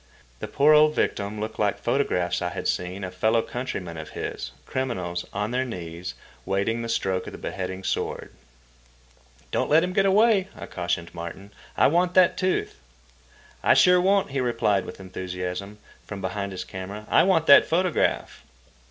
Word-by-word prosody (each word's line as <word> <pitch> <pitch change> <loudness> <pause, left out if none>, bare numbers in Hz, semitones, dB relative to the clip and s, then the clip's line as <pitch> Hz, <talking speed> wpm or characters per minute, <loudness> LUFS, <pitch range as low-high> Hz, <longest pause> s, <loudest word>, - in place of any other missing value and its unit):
The - - -5
poor 150 +2 +4
old 150 0 +5
victim 105 +1 -1
looked 110 +1 -5
like 105 -2 +1
photographs 120 -9 0
I 90 - -1
had - - -4
seen 90 +2 -2
of 90 -1 -5
fellow 110 +5 +2
countrymen 100 -10 -5
of 80 -1 -7
his, - - -4 0.2
criminals, 90 -10 -3
on 105 +3 -2
their 130 +1 0
knees, 90 -7 -6 0.3
waiting 100 - -1
the 115 - -5
stroke 95 -4 -1
of - - -7
the - - -7
beheading 95 0 -5
sword. - - -3 1.2
"Don't - - 0
let 160 +3 +5
him 180 0 -2
get 195 +1 +3
away," 205 -1 +4
I - - -7
cautioned 85 -1 -3
to - - -21
Martin. 85 +4 -8 0.3
"I - - +5
want 175 +4 +2
that 185 -1 +5
tooth." 185 0 -1 0.8
"I - - +4
sure 180 0 +6
won't," 195 -3 +2
he 135 -1 -1
replied 105 -5 +1
with - - -9
enthusiasm, 90 +1 -5 0.3
from 100 - -6
behind 100 -1 -3
his 95 - -5
camera. 100 +3 -7
"I - - +5
want 180 -4 +3
that 140 - +8
photograph." 180 +2 0
105 Hz, 170 wpm, -25 LUFS, 90-150 Hz, 1.2 s, that